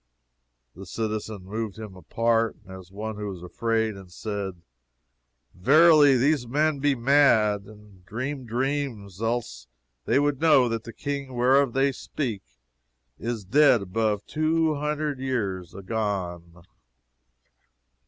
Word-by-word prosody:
The 95 +1 -11
citizen 110 -1 -4
moved 110 +1 -5
him 105 -4 -8
apart, 115 +6 0
as 95 -1 -11
one 110 +2 -5
who 105 -1 -4
is 90 - -12
afraid, 110 +3 -1
and 95 -2 -13
said, 100 -1 -5 0.9
Verily 145 - +6
these 135 0 +1
men 150 +3 +1
be 145 0 +2
mad, 115 -6 +3
and 105 -3 -16
dream 130 +6 -5
dreams, 120 -6 -3
else 115 - -3 0.4
would 145 -1 +2
they 165 - +2
know 135 -5 +6
that 115 -1 -3
the 115 - -7
King 140 -2 -5
whereof 130 +1 +3
they 135 +1 +2
speak 125 -5 -4 0.8
is 115 -3 -4
dead 130 0 +4
above 105 +1 -1
two 155 +1 +1
hundred 150 -1 -2
years 100 -10 -3
agone. 90 -5 -4
115 Hz, 125 wpm, -25 LUFS, 100-140 Hz, 0.9 s, Verily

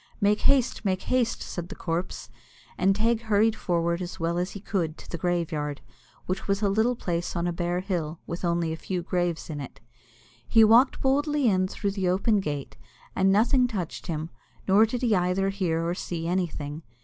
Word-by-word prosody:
"Make 210 0 +2
haste, 265 -5 +2
make 190 -2 0
haste!" 250 -3 0
said 175 0 -6
the 205 - -7
corpse; 165 -8 -4 0.4
and 195 +1 +3
Teig 225 +2 +1
hurried 220 0 +2
forward 170 0 0
as 180 0 -6
well 170 +1 0
as 180 +1 -2
he 200 - -7
could 170 -5 -2
to - - -13
the 170 - -5
graveyard, 155 -4 -1 0.5
which 185 +1 -3
was 200 +1 0
a 200 - +3
little 220 +5 +2
place 175 -5 -3
on 170 0 0
a 175 - 0
bare 175 +1 -1
hill, 170 -4 -3
with 170 +2 -6
only 170 -2 0
a - - -5
few 180 +1 -3
graves 175 -2 -1
in 150 -3 -5
it. 135 - -9 0.7
He 225 -1 +6
walked 230 +5 +5
boldly 290 +1 +2
in 185 -3 +3
through 200 +1 -2
the 190 -2 -1
open 200 +4 +2
gate, 145 - -4 0.4
and 195 0 +3
nothing 245 +5 +4
touched 190 -10 -5
him, 160 0 -3 0.4
nor 205 +3 +6
did 245 +3 -4
he 225 -4 +3
either 180 +2 +1
hear 170 -4 -1
or 170 - 0
see 170 -2 -4
anything. 165 -4 -2
185 Hz, 195 wpm, -26 LUFS, 170-210 Hz, 0.7 s, He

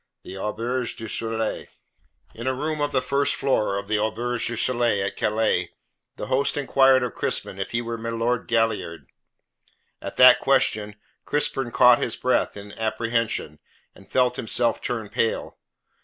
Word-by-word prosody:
THE 95 - -9
AUBERGE 115 +5 -3
DU 115 - -7
SOLEIL 115 0 -2 0.7
In 115 +3 -7
a 130 - 0
room 155 +2 -3
of 145 0 0
the 130 -2 0
first 140 +2 0
floor 105 -7 0
of 100 - -5
the 110 -1 0
Auberge 115 +3 -1
du 120 - -3
Soleil, 120 -4 +2
at - - -4
Calais, 105 -5 0 0.5
the - - -6
host 135 +6 +1
inquired 135 -2 +4
of 125 - -3
Crispin 95 - -2
if 95 - -3
he 120 0 -2
were 115 -1 -5
milord 115 +1 -2
Galliard. 110 -8 -1 1.0
At - - -7
that 125 0 +8
question 110 -6 +1 0.3
Crispin 145 -4 0
caught 125 0 +5
his - - -1
breath - - 0
in 100 0 -10
apprehension, 110 -7 -1 0.3
and - - -18
felt 125 -1 +2
himself 115 0 0
turn 115 -3 -3
pale. 115 - -2
115 Hz, 155 wpm, -24 LUFS, 110-130 Hz, 1.0 s, that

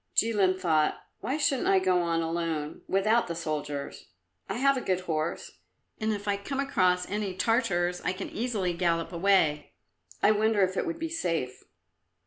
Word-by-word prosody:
Jilin 200 -5 +3
thought, 160 -4 +2 0.2
"Why 260 +8 -2
shouldn't 275 -4 +1
I 195 - +5
go 185 -1 +3
on 165 -1 0
alone 165 -2 -3
without 215 +5 +2
the 170 - -4
soldiers? 150 -3 -4 0.4
I - - -2
have 275 +3 +3
a 260 - -2
good 185 -5 0
horse, 160 -2 -3 0.4
and 220 -1 0
if 205 -1 -4
I 200 0 +1
come 265 +7 -4
across 185 -10 +2
any 205 -2 -3
Tartars 185 -5 +1
I - - 0
can 185 - -6
easily 215 -6 -1
gallop 170 -1 0
away. 170 -4 +2 0.5
I - - +6
wonder 215 -1 +3
if 185 0 0
it - - -1
would 335 -1 -3
be 330 0 -3
safe?" 165 - -2
185 Hz, 170 wpm, -28 LUFS, 170-220 Hz, 0.5 s, I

